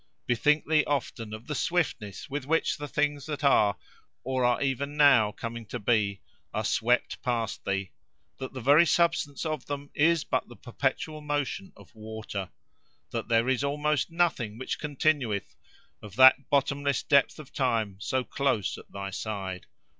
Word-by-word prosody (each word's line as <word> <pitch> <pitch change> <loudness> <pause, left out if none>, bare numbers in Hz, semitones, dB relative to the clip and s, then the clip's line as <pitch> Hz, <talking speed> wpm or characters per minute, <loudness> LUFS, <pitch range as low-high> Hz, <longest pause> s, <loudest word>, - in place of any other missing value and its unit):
"Bethink 145 +6 +2
thee 155 -1 +4
often 120 -6 -2
of 110 +2 -8
the 150 - -4
swiftness 140 - -2
with 140 -1 -5
which 160 +2 +1
the 145 - -5
things 145 -1 -1
that 150 -1 -4
are, 105 -7 +4 0.5
or 130 0 -1
are 120 0 +3
even 140 +2 -2
now 125 -8 +6
coming 115 +2 -6
to - - -4
be, 100 -2 +1 0.3
are - - -1
swept - - +1
past 115 -4 -2
thee: 95 -1 -2 0.5
that 130 - -5
the 130 - -7
very 145 +7 +6
substance 170 -4 +1
of 155 -4 -3
them 145 0 -5
is 160 +1 +3
but - - -1
the 120 - -12
perpetual 140 +6 -3
motion 145 -9 -3
of 100 -2 -17
water: 110 -3 -6 0.6
that - - -3
there 115 +1 +2
is 130 0 +1
almost 150 +1 0
nothing 160 -11 0
which 130 - -4
continueth: 140 -7 0 0.5
of 105 -2 -11
that 130 +2 +7
bottomless 140 0 +1
depth 140 -1 +3
of 155 -4 -12
time, 115 -7 0
so 130 +5 -1
close 130 -7 -1
at - - -16
thy 100 0 -5
side. 95 -3 -5
130 Hz, 160 wpm, -28 LUFS, 110-145 Hz, 0.6 s, that